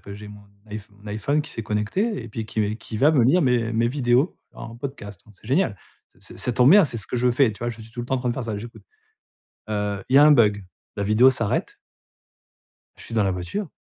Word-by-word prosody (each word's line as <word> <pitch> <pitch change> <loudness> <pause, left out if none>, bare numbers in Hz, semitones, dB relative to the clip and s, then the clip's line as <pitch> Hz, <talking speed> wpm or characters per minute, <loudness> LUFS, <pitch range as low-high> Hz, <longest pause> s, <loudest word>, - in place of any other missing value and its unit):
que 100 - -10
j'ai 105 +1 -10
mon 105 0 -12 0.3
iPh 105 0 -5
mon 100 +1 -19
iPhone 140 +9 -1
qui 150 - -9
s'est 115 - -5
connecté 110 - -1
et 115 - -9
puis 110 0 -6
qui 110 -1 -2
qui 115 -1 -8
va 145 +5 +5
me 135 -7 +3
lire 170 +7 +4
mes 120 -3 +1
mes 115 +1 +1
vidéos 130 +3 +1 0.2
en 115 - -10
podcast, 120 -7 -8
donc 105 - -18
c'est - - -18
génial! 140 - +1 0.4
Ç - - -14
ç - - -13
ça 125 - -2
tombe 125 +3 +5
bien, 200 +2 +8
c'est 125 - -4
ce 95 - -7
que - - -3
je 125 +1 +2
fais, 125 0 +3
tu 105 - -14
vois? 120 - -3
Je 115 -1 -10
suis 110 - -12
tout 120 - -6
le 120 - -6
temps 130 - -1
en 130 - 0
train 125 - -2
de 120 - -1
faire 130 - -4
ça, 110 -3 -3
j'écoute. 115 +3 -10 0.9
Heu 105 -1 -2
il 135 - +4
y - - +10
a 145 - +8
un 150 - +7
bug: 105 -6 +3 0.3
la 100 - -2
vidéo 110 +6 +5
s'arrête 115 -5 -2 1.2
Je - - -13
suis - - -8
dans 110 -3 +2
la 95 - +1
voiture. 90 - -4
115 Hz, 265 wpm, -23 LUFS, 105-130 Hz, 1.2 s, y